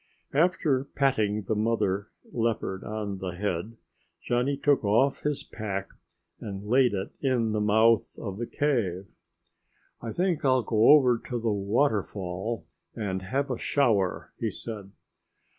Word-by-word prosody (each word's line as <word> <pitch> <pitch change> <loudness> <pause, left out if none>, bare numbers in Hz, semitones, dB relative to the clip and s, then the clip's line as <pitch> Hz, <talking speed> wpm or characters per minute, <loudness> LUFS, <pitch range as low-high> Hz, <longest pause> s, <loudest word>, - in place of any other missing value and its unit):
After 150 -4 +2
patting 110 -8 +1
the 95 - -1
mother 105 -2 0 0.2
leopard 115 -5 -1
on 105 -2 -4
the 95 -2 -4
head, 100 +3 -3 0.5
Johnny 125 +3 0
took 145 -2 +2
off 115 +7 +2
his 150 -1 -1
pack 100 -3 -5 0.5
and 100 -1 -6
laid 125 0 +3
it 95 - -4
in 125 -5 +1
the 105 0 0
mouth 110 +2 +3
of 100 -2 -6
the 120 - -3
cave. 110 -11 0 1.0
"I 115 - -4
think 180 0 0
I'll 130 -2 +3
go 110 +1 +3
over 130 -5 +6
to 120 -2 -2
the 115 -1 0
waterfall 100 -2 -1 0.3
and 95 -4 -3
have 135 +8 -1
a 125 - -3
shower," 110 -10 +1
he - - 0
said. 105 -4 -7
110 Hz, 140 wpm, -27 LUFS, 100-130 Hz, 1.0 s, over